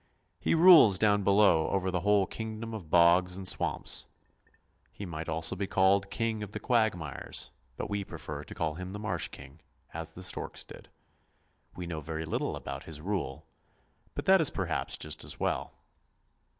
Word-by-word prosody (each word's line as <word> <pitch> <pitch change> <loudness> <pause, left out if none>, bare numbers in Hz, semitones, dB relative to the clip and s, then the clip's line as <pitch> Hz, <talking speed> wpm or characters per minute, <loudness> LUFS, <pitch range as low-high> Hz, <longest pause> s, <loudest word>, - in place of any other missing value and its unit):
He - - +1
rules 165 - +8
down 105 0 +3
below 100 -5 +4
over 95 -1 0
the 90 - 0
whole 100 +1 +3
kingdom 110 +2 -6
of 95 -8 -7
bogs 90 +2 +4
and 95 -1 -5
swamps. - - 0 0.8
He 100 - -8
might 80 -2 -6
also 80 +2 +1
be 95 +1 -3
called 100 +1 +3
King 115 -2 -2
of 105 0 -7
the - - -4
Quagmires, 110 - -1 0.3
but - - -3
we 100 -1 -2
prefer - - -7
to - - -9
call 80 -2 -1
him 90 +3 -7
the 105 - -6
Marsh 110 +1 -2
King, 70 +2 -13 0.3
as 80 0 -4
the 90 - -8
storks 90 - -3
did. - - -13 0.9
We 90 - -6
know 80 -2 -5
very 80 +2 -5
little 80 - -2
about - - -7
his 80 -2 -6
rule, 90 -6 -3 0.7
but - - -4
that 190 -2 +6
is 155 - +5
perhaps 85 -5 -2
just 75 - -3
as - - -4
well. - - -1
95 Hz, 175 wpm, -30 LUFS, 80-105 Hz, 0.9 s, rules